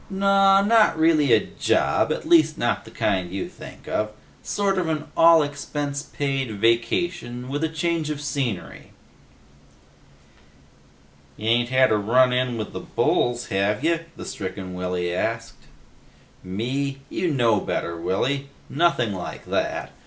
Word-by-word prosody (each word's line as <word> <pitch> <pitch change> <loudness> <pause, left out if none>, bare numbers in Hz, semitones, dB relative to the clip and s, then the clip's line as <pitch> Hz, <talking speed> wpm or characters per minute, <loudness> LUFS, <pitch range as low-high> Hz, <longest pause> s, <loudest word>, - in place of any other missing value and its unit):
"Naw, 195 0 +4
not 215 -5 +4
really 160 -4 +3
a - - +7
job. - - +1
At - - -3
least 155 -2 +4
not 120 - -1
the - - -11
kind 95 -5 -1
you 95 0 -3
think - - -13
of. 105 0 -1 0.3
Sort 195 -2 0
of 175 - -1
an 155 -1 -3
all 165 -1 +6
expense 145 0 -4
paid 135 -6 -3
vacation, 120 - 0
with 145 +3 -2
a 160 - +1
change 160 -1 -1
of 150 -2 -3
scenery." 135 -9 -4 2.4
"Ya 110 +1 -3
ain't 120 0 +2
had 130 -1 +4
a 110 - +3
run 125 +5 +3
in 125 -1 0
with 110 - -5
the - - -4
bulls, 120 0 0
have 100 +5 0
ya?" 165 +1 +2 0.2
the - - -8
stricken 95 -2 -6
Willy 90 -1 -2
asked. 115 -4 -3 0.8
"Me? 135 +9 -3
You 175 0 -1
know 120 -7 +2
me - - -9
better, 85 - -2
Willy. 135 +11 -1 0.2
Nothing 140 -8 +1
like 90 -2 -7
that. - - -2
130 Hz, 145 wpm, -23 LUFS, 110-160 Hz, 2.4 s, a